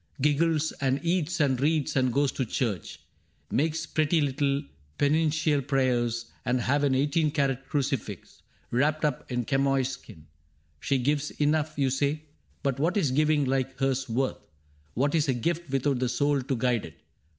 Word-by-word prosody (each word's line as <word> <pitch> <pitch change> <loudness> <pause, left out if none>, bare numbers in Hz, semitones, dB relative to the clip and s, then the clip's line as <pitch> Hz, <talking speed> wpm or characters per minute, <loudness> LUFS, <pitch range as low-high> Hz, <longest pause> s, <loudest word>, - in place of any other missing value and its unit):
Giggles 155 +2 +2
and 135 0 +1
eats 175 0 0
and 135 -4 +2
reads 155 0 +1
and 130 -2 +2
goes 140 +1 +2
to 130 - -2
church. 115 - -3 0.5
Makes 160 +3 0
pretty 155 +1 +1
little 140 0 0 0.3
penitential 155 0 +2
prayers. 120 -4 0 0.2
And 125 +1 +1
has 140 +4 +1
an 135 -2 +2
eighteen 150 +3 +2
carat 135 -3 -1
crucifix 135 - -3 0.3
Wrapped 150 +5 +1
up 145 -3 -2
in 125 -1 -1
chamois 135 0 +2
skin. 85 - -10 0.5
She 135 - 0
gives 145 +3 0
enough. 155 +1 +1
You 135 -2 +1
say; 145 +3 0 0.4
but 135 -2 0
what 170 +7 +1
is 155 -10 +2
giving 150 +1 +2
like 135 0 -1
hers 135 -1 0
worth? 130 +4 -1 0.6
What 140 +4 +1
is 155 -3 +2
a 130 - +2
gift 170 +5 -2
without 135 0 0
the 125 -1 0
soul 145 +2 +1
to 130 +1 -2
guide 120 -2 0
it - - -12
140 Hz, 160 wpm, -27 LUFS, 130-150 Hz, 0.6 s, Giggles